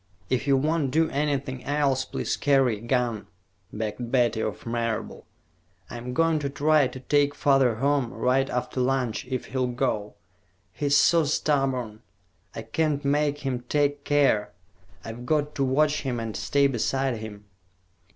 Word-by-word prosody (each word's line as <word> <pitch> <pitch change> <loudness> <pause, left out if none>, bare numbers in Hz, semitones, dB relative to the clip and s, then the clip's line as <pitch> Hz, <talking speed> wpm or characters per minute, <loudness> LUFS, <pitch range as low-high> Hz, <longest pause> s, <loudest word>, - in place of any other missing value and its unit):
"If 130 +2 0
you 135 -1 +4
won't 150 0 0
do 160 +4 +1
anything 140 -3 -2
else, 140 -2 0
please - - -2
carry 135 -6 +2
a - - -15
gun," 120 -3 -1 0.4
begged 110 +2 -4
Betty 120 -4 +2
of 110 - -4
Marable. 115 -1 -3 0.6
"I'm 125 +1 -6
going 165 0 +2
to 140 -1 -3
try 145 0 +3
to 130 - -9
take 145 +1 +2
father 135 -5 +3
home, 135 0 0
right 135 +1 +1
after 125 +1 -2
lunch, 125 -2 -1
if 130 -1 -3
he'll 130 -1 +1
go. 120 -4 -2 0.6
He's 145 -1 +2
so 165 +3 +4
stubborn. 135 -7 -1 0.5
I 115 - -5
can't 145 +5 -1
make 145 +1 +1
him 130 -2 -1
take 145 -1 +1
care. 140 -9 +2 0.6
I've 115 +2 -7
got 150 0 0
to 140 - -1
watch 145 +3 +2
him 125 -4 -3
and 115 -2 -5
stay 140 +7 +1
beside 135 0 0
him." 105 -1 -9
135 Hz, 150 wpm, -25 LUFS, 120-145 Hz, 0.6 s, you